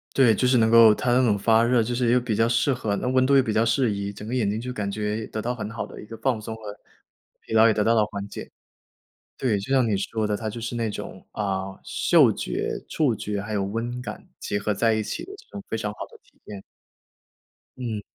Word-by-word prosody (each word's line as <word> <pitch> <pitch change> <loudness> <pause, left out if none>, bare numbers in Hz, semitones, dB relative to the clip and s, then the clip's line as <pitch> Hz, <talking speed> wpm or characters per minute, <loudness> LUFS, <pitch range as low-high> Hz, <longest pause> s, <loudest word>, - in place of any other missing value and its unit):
对， 120 -5 +5
就 125 - 0
是 125 0 +4
能 110 -1 +4
够 115 -2 +8
它 120 +2 0
那 130 +1 +4
种 100 -3 +2
发 115 +2 +4
热， 120 0 +3
就 120 +2 -2
是 120 -1 +1
又 125 - +4
比 120 -3 -2
较 115 +1 +3
适 125 +3 +2
合 105 -5 -2
那 - - -3
温 130 0 +3
度 140 0 +4
又 - - +6
比 110 -4 -2
较 110 - +3
适 115 -1 +2
宜， 100 0 -3
整 105 +1 -10
个 125 - -3
眼 110 -5 +1
睛 105 +2 -2
就 125 +1 -5
感 100 -3 -3
觉 105 +1 -3
得 110 - -4
到 125 +2 -2
很 105 -2 -5
好 115 - -4
的 - - -10
一 - - -11
个 115 +1 -9
放 125 -5 0
松 110 - -6
和 105 -2 -9 0.6
疲 - - -9
劳 110 0 +6
也 110 - +5
得 105 - 0
到 115 +2 +3
了 105 -2 +4
缓 100 -1 -6
解。 - - -9 0.9
对， 115 -6 +1
就 100 +7 -6
像 130 -3 +3
你 105 - +1
说 105 +2 -2
的， 105 - 0
它 110 0 -4
就 115 +3 -7
是 115 +1 -4
那 115 -2 -1
种， - - -8
啊， 95 -2 -3
嗅 - - +4
觉、 - - -3
触 140 -8 +1
觉， 100 0 -4
还 105 +1 -6
有 100 -2 0
温 115 +5 -3
感， 105 -4 -8
结 100 - -3
合 105 +1 -1
在 115 +2 +2
一 110 - 0
起 - - -5
的 390 - -10
这 445 - -17
种 200 - -8
非 110 - -2
常 105 -1 -3
好 - - -20
的 - - -15
体 - - -30
验。 100 -2 -8 1.2
嗯。 115 -5 -4
110 Hz, 280 characters per minute, -24 LUFS, 105-120 Hz, 1.2 s, 够